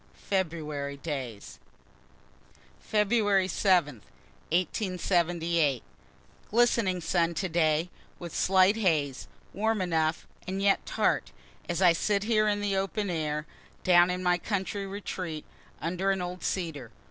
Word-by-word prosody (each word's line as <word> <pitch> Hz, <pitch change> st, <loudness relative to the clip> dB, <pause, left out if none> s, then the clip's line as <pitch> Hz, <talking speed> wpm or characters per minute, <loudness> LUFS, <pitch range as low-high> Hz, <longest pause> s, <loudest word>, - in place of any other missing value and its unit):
FEBRUARY 155 Hz, -7 st, -3 dB
DAYS 120 Hz, -, -6 dB, 1.2 s
February 205 Hz, -2 st, +2 dB
7, 175 Hz, -, +2 dB, 0.5 s
1878. 170 Hz, -, 0 dB, 0.7 s
Glistening 225 Hz, -5 st, +2 dB
sun 170 Hz, 0 st, +1 dB
today, 165 Hz, -1 st, +1 dB, 0.3 s
with 170 Hz, -2 st, -8 dB
slight 190 Hz, +2 st, +4 dB
haze, 155 Hz, -10 st, 0 dB, 0.3 s
warm 220 Hz, +2 st, 0 dB
enough, 160 Hz, -3 st, 0 dB, 0.2 s
and 190 Hz, +1 st, -3 dB
yet 195 Hz, 0 st, +2 dB
tart, 65 Hz, -, 0 dB, 0.4 s
as 175 Hz, +2 st, 0 dB
I 175 Hz, -2 st, +7 dB
sit 200 Hz, +4 st, 0 dB
here 215 Hz, -1 st, +2 dB
in 205 Hz, -1 st, +1 dB
the 200 Hz, -1 st, 0 dB
open 195 Hz, +1 st, -1 dB
air, 150 Hz, -2 st, -2 dB, 0.4 s
down 175 Hz, -1 st, +6 dB
in 180 Hz, 0 st, -2 dB
my 180 Hz, 0 st, +2 dB
country 200 Hz, +1 st, -3 dB
retreat, 185 Hz, -5 st, -5 dB, 0.3 s
under 180 Hz, +4 st, -1 dB
an 195 Hz, -1 st, +1 dB
old 180 Hz, 0 st, -5 dB
cedar. 160 Hz, -10 st, -3 dB
180 Hz, 115 wpm, -28 LUFS, 160-195 Hz, 1.2 s, I